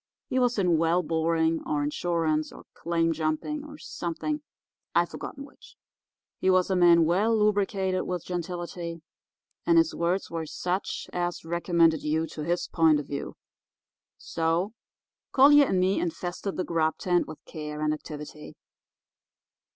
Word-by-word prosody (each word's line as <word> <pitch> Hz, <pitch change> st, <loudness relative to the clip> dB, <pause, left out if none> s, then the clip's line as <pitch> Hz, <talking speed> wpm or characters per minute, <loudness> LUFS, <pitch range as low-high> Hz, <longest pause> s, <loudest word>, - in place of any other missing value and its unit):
He 260 Hz, -, +1 dB
was 245 Hz, -2 st, +2 dB
in 180 Hz, -5 st, +3 dB
well 165 Hz, +2 st, +2 dB
boring 165 Hz, 0 st, +1 dB
or 145 Hz, -1 st, -1 dB
insurance 155 Hz, 0 st, 0 dB
or -, -, -12 dB
claim 165 Hz, 0 st, 0 dB
jumping, 160 Hz, -, -2 dB
or 295 Hz, 0 st, -10 dB
something—I've 295 Hz, -, -4 dB
forgotten 280 Hz, -, -7 dB
which. 280 Hz, -, -18 dB, 0.6 s
He 190 Hz, -, +2 dB
was 185 Hz, 0 st, +3 dB
a -, -, +2 dB
man 170 Hz, -2 st, +6 dB
well 205 Hz, +7 st, +2 dB
lubricated 195 Hz, -3 st, +1 dB
with 180 Hz, -2 st, -3 dB
gentility, 175 Hz, -1 st, -5 dB, 0.6 s
and 335 Hz, 0 st, +4 dB
his 330 Hz, 0 st, +4 dB
words 175 Hz, +3 st, -1 dB
were 165 Hz, -1 st, -3 dB
such 180 Hz, +5 st, -3 dB
as 175 Hz, -1 st, -2 dB
recommended 170 Hz, -1 st, +2 dB
you 155 Hz, +2 st, 0 dB
to 150 Hz, -, -6 dB
his 170 Hz, +3 st, -1 dB
point 160 Hz, -3 st, +4 dB
of 145 Hz, -, -5 dB
view. 140 Hz, 0 st, -5 dB, 0.8 s
So, 165 Hz, +5 st, -1 dB, 0.6 s
Collier 285 Hz, +1 st, +7 dB
and 185 Hz, -, +1 dB
me 185 Hz, +2 st, +2 dB
infested 175 Hz, +3 st, -3 dB
the 185 Hz, -, 0 dB
grub 160 Hz, -2 st, 0 dB
tent 175 Hz, -1 st, +1 dB
with 155 Hz, -, -8 dB
care 150 Hz, -1 st, -6 dB
and 155 Hz, 0 st, +2 dB
activity. 150 Hz, 0 st, -8 dB
170 Hz, 145 wpm, -27 LUFS, 160-190 Hz, 0.8 s, Collier